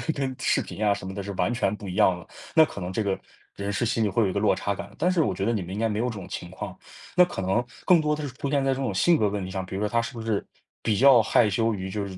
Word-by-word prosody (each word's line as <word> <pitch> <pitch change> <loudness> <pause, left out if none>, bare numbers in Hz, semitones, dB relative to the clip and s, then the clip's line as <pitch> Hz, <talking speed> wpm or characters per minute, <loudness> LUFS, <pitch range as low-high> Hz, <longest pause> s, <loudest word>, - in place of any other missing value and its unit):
跟 135 -2 -2
视 - - +2
频 110 - -6
啊 105 - +4
什 95 - -7
么 95 - -5
的， 100 - -4
是 100 +1 -5
完 90 +4 0
全 120 -3 0
不 105 -1 -9
一 90 - -4
样 90 -2 +4
的。 - - -14 0.3
那 160 -1 +8
可 125 - -8
能 90 +1 -4
这 110 +4 -1
个， 100 -2 -1 0.4
人 100 0 -3
是 100 +4 0
心 115 0 +1
里 105 - +2
会 115 +3 +2
有 100 - +1
一 - - -3
个 100 - 0
落 105 -1 +3
差 100 - -2
感 100 - -7
的。 105 - -18
但 180 +4 +2
是 180 -3 +2
我 100 - 0
觉 95 - -2
得 115 - +1
你 105 - -1
们 90 0 -7
应 100 - -4
该 115 - +2
没 105 -1 -2
有 120 - +1
这 - - -5
种 100 -4 -8
情 85 - -6
况， 95 - -7 0.4
那 180 - +8
可 175 - -3
能 95 +6 +1 0.2
更 175 -3 +6
多 150 0 +1
的 150 - -6
是 130 - -9
出 140 - -3
现 140 -1 +1
在 135 - +3
这 130 - -5
种 130 -5 -1
性 170 - +4
格 105 -7 +2
问 100 -1 -3
题 95 - -7
上。 95 0 -3
比 95 +1 -7
如 100 - -3
说 105 - +1
他 115 +2 +1
是 115 - -6
不 115 - -6
是 110 -2 -1 0.4
比 110 -3 +1
较 135 -1 +7
害 110 +1 +3
羞 115 +3 +1
于 95 -2 -4
就 100 +1 -3
是 95 -1 -8
105 Hz, 380 characters per minute, -26 LUFS, 95-125 Hz, 0.4 s, 那